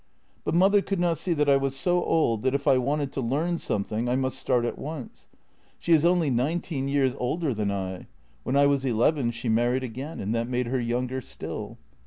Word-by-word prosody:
But - - -1
mother 195 +3 +5
could 195 -1 -2
not 170 -3 +1
see 175 +1 0
that 150 -2 +1
I 140 -1 +6
was 135 0 -1
so 175 +5 +1
old 115 -9 +1
that 130 +2 +1
if 140 - -2
I 130 - +5
wanted 140 +2 -1
to 135 - -3
learn 155 +8 0
something 105 +3 -2
I 125 - +2
must 130 0 -1
start 125 -2 +1
at - - -4
once. 150 -3 -7 0.5
She 170 - +1
is 155 -2 +5
only 175 -3 +3
46 125 - +1
JENNY 130 +4 +1
nineteen 165 -5 -3
years 135 -2 +1
older 150 +3 -1
than 105 -2 -1
I; 95 -2 -4 0.3
when 130 - -2
I 140 0 +5
was 140 -1 +2
eleven 125 +2 +2
she 120 +1 -5
married 120 +3 +2
again, 130 +6 -6
and 100 +3 -2
that 115 +1 -1
made 125 0 0
her 125 +1 -1
younger 125 +2 -2
still. - - -7
135 Hz, 225 wpm, -26 LUFS, 120-155 Hz, 0.5 s, I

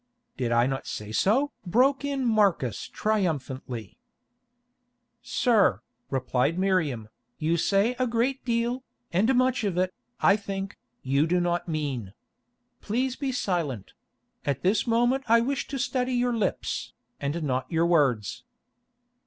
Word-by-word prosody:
"Did 120 -2 -2
I 120 +1 +4
not 135 +1 -3
say 105 0 -5
so?" 255 - +2
broke 260 +10 +3
in 280 -2 -1
Marcus 200 - +2
triumphantly. 140 - -2 1.2
"Sir," 205 - +2 0.3
replied 130 +4 0
Miriam, 170 - +1 0.3
"you 160 +2 +1
say 200 +8 +2
a 255 - +2
great 240 +4 0
deal, 235 +1 0 0.3
and 220 +9 +3
much 255 0 +2
of 195 -4 -1
it, 185 0 +1 0.3
I 200 - +5
think, 195 -1 -5 0.2
you 140 +4 +2
do 180 +2 +2
not 175 0 0
mean. 140 - -3 0.7
Please 250 +4 -1
be 275 -1 -2
silent; 165 - -2 0.5
at 140 -3 -2
this 200 +6 +2
moment 240 +3 +2
I 230 +1 +6
wish 270 +4 -1
to 275 - -4
study 255 0 -1
your 245 -1 +1
lips, 210 -4 -2 0.3
and 145 +4 -2
not 130 -3 -1
your 165 0 +2
words." 135 - +2
190 Hz, 135 wpm, -27 LUFS, -, 1.2 s, I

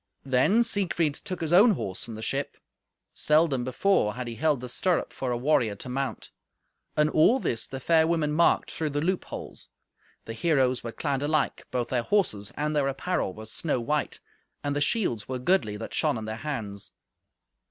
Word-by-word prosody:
Then 135 - +3
Siegfried 180 -8 +1
took 180 +3 -6
his 165 0 -1
own 210 +5 +7
horse 95 - -4
from 115 - -7
the 110 - -7
ship. 135 +4 -3 0.6
Seldom 150 -4 +3
before 130 - +1
had 125 -1 -5
he 120 - -4
held 150 +2 +1
the 125 - -6
stirrup 175 +7 0
for 130 - -3
a 120 - 0
warrior 120 -5 +2
to 125 - -9
mount. 135 +1 -3 0.7
And 150 0 +4
all 220 +12 +5
this 115 - -1
the 135 - -6
fair 160 +3 +3
women 160 -3 +1
marked 165 +3 +3
through 155 -2 -2
the 145 0 -2
loopholes. 185 +3 -3 0.6
The 115 - -5
heroes 130 -2 +1
were 115 - -4
clad 140 +1 -2
alike; 150 0 0
both 125 -2 -2
their 125 -2 +1
horses 115 - 0
and 150 +1 -1
their 145 -2 +2
apparel 135 - -2
were 110 - -9
snow 140 +4 -1
white, 150 +5 -1 0.4
and 145 0 -1
the 145 - 0
shields 145 - 0
were 130 - -2
goodly 125 - +1
that 110 - -7
shone - - +1
in 110 - -5
their 110 0 -4
hands. 115 -8 -5
140 Hz, 185 wpm, -27 LUFS, 120-160 Hz, 0.7 s, own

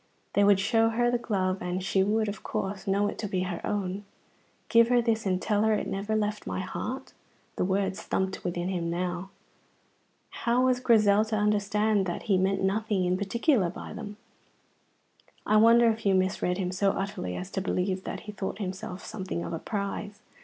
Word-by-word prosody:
They 205 - +4
would 200 -1 +5
show 225 +3 +3
her 240 +2 +1
the 245 - +1
glove, 190 -4 -1
and 180 +1 -2
she 190 0 +2
would, 215 +3 +1
of 205 +1 -5
course, 195 +1 -4
know 200 +1 +2
it - - -5
to 210 - -2
be 185 -2 -1
her 180 -2 -3
own. 200 -1 -2 0.6
"Give 230 0 +5
her 245 0 +4
this 225 -3 0
and 185 -1 +1
tell 210 +1 +1
her 220 0 +3
it - - -2
never 200 +3 -2
left 210 -1 -1
my - - -2
heart." 260 +8 -5 0.4
The - - 0
words 190 +1 0
thumped 190 0 -2
within 175 0 -2
him 175 -3 -2
now. 180 +2 -3 1.0
How 240 +2 +1
was 255 -1 +2
Grizel 215 -4 +4
to 220 0 -2
understand 210 -1 +1
that 175 - -4
he 205 - +1
had 185 - +3
meant 195 0 +1
nothing 200 -1 +1
in 180 +1 +2
particular 205 - +1
by 180 - -8
them? 210 -2 -7 1.3
I 215 - +4
wonder 230 +2 +6
if 225 +1 -6
you 195 -1 +3
misread 185 -1 +1
him 185 -2 -2
so 195 +1 +1
utterly 195 - -3
as 185 +1 -6
to 190 - -2
believe 185 0 -1
that - - -5
he 215 - -8
thought 195 -2 -4
himself 190 -1 -5
something 190 -5 -4
of - - -5
a 165 - -3
prize? 205 +1 -4
200 Hz, 195 wpm, -28 LUFS, 185-215 Hz, 1.3 s, wonder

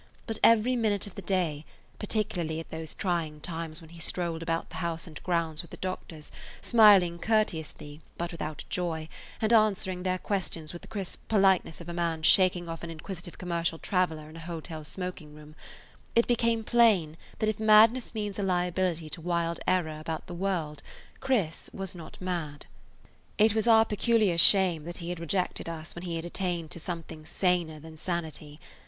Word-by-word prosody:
But 225 -2 -3
every 230 +2 +5
minute 215 -4 +1
of 205 - -10
the 200 - -7
day, 175 -6 -1 0.4
particularly 180 -7 -1
at 165 - -9
those 160 -1 -5
trying 165 -5 -1
times 165 0 -5
when 160 0 -14
he 170 - -12
strolled 170 -1 -2
about 165 0 -2
the - - -7
house 170 -2 -3
and 160 -4 -10
grounds 170 -3 0
with 170 - -15
the - - -10
doctors, 170 -4 -6 0.3
smiling 200 -7 +6
courteously, 160 -8 -1 0.2
but 170 +1 -3
without 155 -2 -5
joy, 165 -3 -2 0.3
and 220 +1 +2
answering 195 -4 +3
their 185 0 0
questions 175 -5 -3
with 175 - -8
the - - -13
crisp 195 -4 -6
politeness 195 -6 +3
of 170 - -10
a 170 - -4
man 170 -2 -1
shaking 180 0 +4
off 165 -1 -5
an 170 - -6
inquisitive 175 +2 -7
commercial 170 -2 -1
traveler 160 -4 0
in 155 - -13
a - - -8
hotel 165 -1 -6
smoking 180 -2 -6
room, 150 0 -13 0.6
it 235 - +5
became 230 -1 +1
plain 215 -10 +4 0.2
that 215 - 0
if 215 -1 -1
madness 220 +3 +5
means 210 -2 -3
a - - 0
liability 180 -2 0
to 155 +2 -7
wild 170 0 -1
error 165 -4 +1
about 160 0 -4
the - - -8
world 170 -5 -2 0.4
Chris 225 -12 -1
was 195 -1 -6
not 170 -3 -10
mad. 170 -6 -4 0.7
It 215 0 +5
was 220 +1 0
our 225 -1 +7
peculiar 210 -4 +2
shame 180 -3 +5
that 175 +1 -5
he 170 0 -6
had 175 -1 -4
rejected 170 0 -1
us 165 0 -6
when 175 +1 -7
he 170 -2 -3
had 165 0 -4
attained 175 -2 -3
to - - -6
something 165 -2 -6
saner 170 -2 0
than 160 +1 -12
sanity. 155 -3 -4
175 Hz, 180 wpm, -29 LUFS, 160-195 Hz, 0.7 s, our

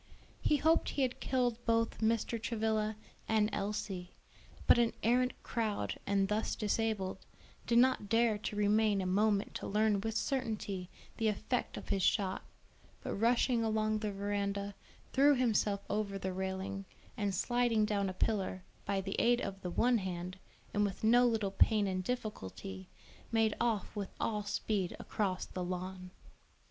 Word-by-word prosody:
He 300 - +3
hoped 320 +3 +3
he 280 - 0
had 255 -1 -1
killed 245 -2 0
both 230 -1 +1
Mr. 225 0 +1
Travilla 220 -1 0 0.3
and 215 -1 +2
Elsie; 195 -3 -3 0.5
but, - - +6
an 235 -1 +3
arrant 250 +3 +3
coward 215 - -2
and 195 -1 +2
thus 210 +2 0
disabled, 210 -3 -1 0.5
did 235 - +3
not 250 -4 +4
dare 225 -1 +3
to 210 - -4
remain 210 0 +3
a 190 - -1
moment 200 +2 +2
to - - -5
learn 210 -1 +2
with 225 +1 -2
certainty 215 -8 -2 0.3
the 225 - +1
effect 220 +4 -1
of - - -8
his 195 - +1
shot, 190 0 +1 0.6
but - - -3
rushing 235 +2 +2
along 215 -1 +1
the 210 -1 -2
veranda, 200 0 -2 0.4
threw 285 +2 +6
himself 215 -5 +1
over 205 -2 -1
the 190 -1 -3
railing, 190 +1 -3 0.3
and 205 -5 -1
sliding 240 0 +2
down 200 -2 0
a - - -4
pillar, 190 -2 -1 0.2
by 200 -1 0
the 195 0 -4
aid 240 +1 +4
of 195 -4 -4
the 180 - -3
one 240 +6 +3
hand, 185 0 -5 0.3
and 205 - +2
with 200 0 -2
no 240 +3 +6
little 220 -4 0
pain 210 +1 +4
and 185 -1 -1
difficulty, 95 - -5 0.4
made 225 -1 +2
off 225 -3 0
with 200 -2 -3
all 210 -2 0
speed 205 -2 -1
across 190 -3 -2
the 185 - -5
lawn. 185 +1 -5
210 Hz, 155 wpm, -33 LUFS, 195-230 Hz, 0.6 s, but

